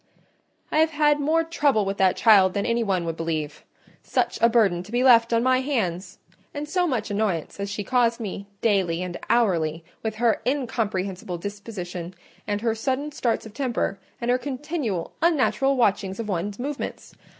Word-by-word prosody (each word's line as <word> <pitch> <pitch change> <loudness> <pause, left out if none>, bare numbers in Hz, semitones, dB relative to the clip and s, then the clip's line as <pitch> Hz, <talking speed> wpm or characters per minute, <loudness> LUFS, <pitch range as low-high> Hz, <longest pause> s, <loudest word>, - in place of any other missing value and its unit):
"I 310 - +2
have 320 0 +4
had 295 -1 +2
more 315 +3 +2
trouble 290 -10 +1
with 195 +1 -2
that 190 -1 +3
child 195 -5 +5
than 200 - 0
any 235 0 +1
one 190 -6 0
would 165 -1 -3
believe. 155 -3 -3 0.4
Such - - -1
a 230 - +6
burden 205 -7 +3
to 190 +4 -12
be 245 +1 +1
left 235 -3 +6
on 230 0 +2
my 255 0 +3
hands—and 215 - -4
so 355 +3 +1
much 230 -8 -2
annoyance 200 -5 -1
as 200 0 -3
she 205 0 -3
caused 235 +1 +2
me, 200 -2 -5
daily 185 -6 +1
and 180 -1 -5
hourly, 170 -8 +2 0.2
with 220 -1 -3
her 230 0 +1
incomprehensible 200 -9 -2
disposition, 185 -3 -6 0.3
and 205 0 -1
her 230 -1 +1
sudden 265 +6 -2
starts 240 -7 -1
of 220 - -10
temper, 240 -6 -2 0.2
and 240 0 0
her 250 - +2
continual, 270 - -3
unnatural 270 -5 +2
watchings 200 -4 +1
of 225 - -3
one's 200 +1 -2
movements! 275 +3 -5
220 Hz, 170 wpm, -24 LUFS, 190-255 Hz, 0.4 s, a